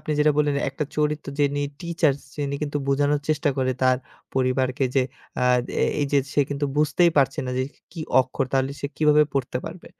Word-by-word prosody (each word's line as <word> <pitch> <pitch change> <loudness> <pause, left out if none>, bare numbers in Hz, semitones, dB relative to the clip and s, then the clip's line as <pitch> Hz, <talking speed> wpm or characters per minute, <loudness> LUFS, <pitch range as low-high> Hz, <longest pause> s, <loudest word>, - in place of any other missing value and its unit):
আপনি 155 - -3
যেটা 150 0 +4
বললেন, 145 -1 +2 0.2
একটা 150 +2 -3
চরিত্র 150 -1 0
যিনি 145 0 +2 0.2
টিচার্স 165 -5 +1 0.2
যিনি, 140 -1 -2
কিন্তু 145 0 -2
বোঝানোর 145 +1 +2
চেষ্টা 150 -1 +2
করে, 130 -1 +1
তার 130 0 +4 0.4
পরিবারকে 130 0 +1
যে 135 - +4 0.4
আ - - +3 0.4
এ - - +5 0.2
এই 145 - +1
যে 140 - +5 0.2
সে 145 - +4
কিন্তু 145 0 -1
বুঝতেই 160 +3 +4
পারছে 135 -1 +2
না, - - -2
যে 130 - +2 0.3
কি 170 - -7 0.2
অক্ষর? 130 +1 -2
তাহলে 135 0 +1
সে - - -2
কিভাবে 150 -1 +5
পড়তে 125 -2 -1
পারবে। 170 +1 -8
145 Hz, 190 wpm, -24 LUFS, 135-150 Hz, 0.4 s, এ